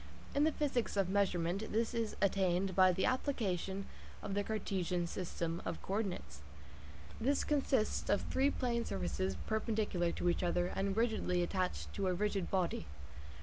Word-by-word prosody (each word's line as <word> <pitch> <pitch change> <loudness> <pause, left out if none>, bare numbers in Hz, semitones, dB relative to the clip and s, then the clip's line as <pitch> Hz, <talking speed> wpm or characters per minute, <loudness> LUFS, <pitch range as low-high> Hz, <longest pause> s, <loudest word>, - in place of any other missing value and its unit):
In 285 +1 +4
the 315 - +3
physics 270 -8 -1
of 195 -2 +2
measurement 190 0 +1
this 225 +2 +1
is 230 -2 -1
attained 190 -1 +2
by 185 -1 +7
the 185 +1 0
application 200 - -1 0.4
of 195 - -3
the 205 +1 +1
Cartesian 185 -5 -1
system 170 -1 -3
of - - -3
co 190 - -3
ordinates. 200 -5 -3 0.8
This 275 +5 +2
consists 270 -6 +1
of 205 - +3
three 270 +2 +2
plane 240 -4 0
surfaces 95 - -2
perpendicular 215 -5 0
to - - -1
each 175 - +2
other 175 0 +1
and 195 +1 0
rigidly 220 -6 +1
attached 185 +1 -2
to 195 -2 -1
a 180 - +2
rigid 200 -1 0
body. 175 - 0
195 Hz, 155 wpm, -35 LUFS, 180-220 Hz, 0.8 s, by